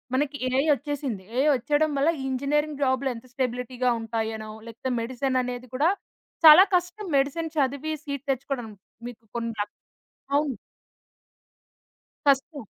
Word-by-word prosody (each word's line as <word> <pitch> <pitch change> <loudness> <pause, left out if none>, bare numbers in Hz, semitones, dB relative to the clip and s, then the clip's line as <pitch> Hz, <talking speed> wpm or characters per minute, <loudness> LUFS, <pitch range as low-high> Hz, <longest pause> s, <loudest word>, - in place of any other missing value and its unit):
మనకి 285 +1 0
ఏఐ 265 +2 +3
ఒచ్చేసింది. 275 -6 -4
ఏఐ 275 +3 +3
ఒచ్చేయడం 295 +5 +1
వల్ల, 280 +4 +3 0.2
ఇంజినీరింగ్ 285 +2 -1
జాబులెంత 260 -2 0
స్టెబిలిటీగా 250 0 -1
ఉంటాయోనో, 220 -1 -3 0.2
లేతే 235 +3 -4
మెడెసెననేది 250 0 -2
కూడా 305 +7 +3 0.5
చాలా 315 +5 +11
కష్టం 360 +4 -1
మెడిసెన్ 310 +4 -1
చదివి 280 +2 0
సీట్ 280 -1 -5
తెచ్చుకోడం. 260 -3 -3 0.4
మీకు 235 -2 -10
కొన్న 230 -1 -2 0.8
అవును. 290 -4 0 1.7
కష్టం. 280 +1 +2
265 Hz, 110 wpm, -26 LUFS, 245-290 Hz, 1.7 s, చాలా